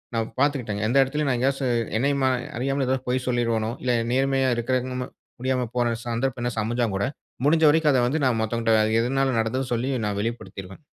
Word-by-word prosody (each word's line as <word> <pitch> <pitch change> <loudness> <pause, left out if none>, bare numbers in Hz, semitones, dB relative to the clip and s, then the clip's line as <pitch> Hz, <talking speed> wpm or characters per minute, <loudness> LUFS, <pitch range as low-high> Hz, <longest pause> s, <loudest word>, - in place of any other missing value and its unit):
நான் 115 0 -1
பாத்துக்கிட்டேங்க. 125 -8 0
எந்த 130 +4 +2
எடத்திலயும் 140 +2 0
நான் 125 - +1
எங்கேயாச்சு, 135 0 0 0.3
என்னையுமா 140 0 +2 0.3
அறியாமல 135 +1 -1
எதோ 130 0 +2
பொய் 125 0 0
சொல்லிருவனோ! 115 -2 0
இல்ல 125 - +1 0.2
நேர்மையா 135 0 +2
இருக்கிறக்கு 130 +1 -1
நம்ம 125 0 -3 0.3
முடியாம 130 -2 0
போற 120 -1 +1
சந்தர்ப்பம் 120 +1 -1
என்னாச்சு 120 -3 -1
அமஞ்சாங்கூட, 115 -4 0 0.4
முடிஞ்ச 160 +2 +4
வரைக்கும் 155 -2 +3
அத 125 - +3
வந்து 145 +2 -1
நான் 120 -3 +2
மத்தவங்கட்ட, 110 -1 +2
எதுனால 135 0 +1
நடந்ததுன்னு 125 +2 -2
சொல்லி 125 +4 -1
நான் 100 -1 -2
வெளிப்படுத்திருவேன். 95 - -6
125 Hz, 170 wpm, -24 LUFS, 115-135 Hz, 0.4 s, முடிஞ்ச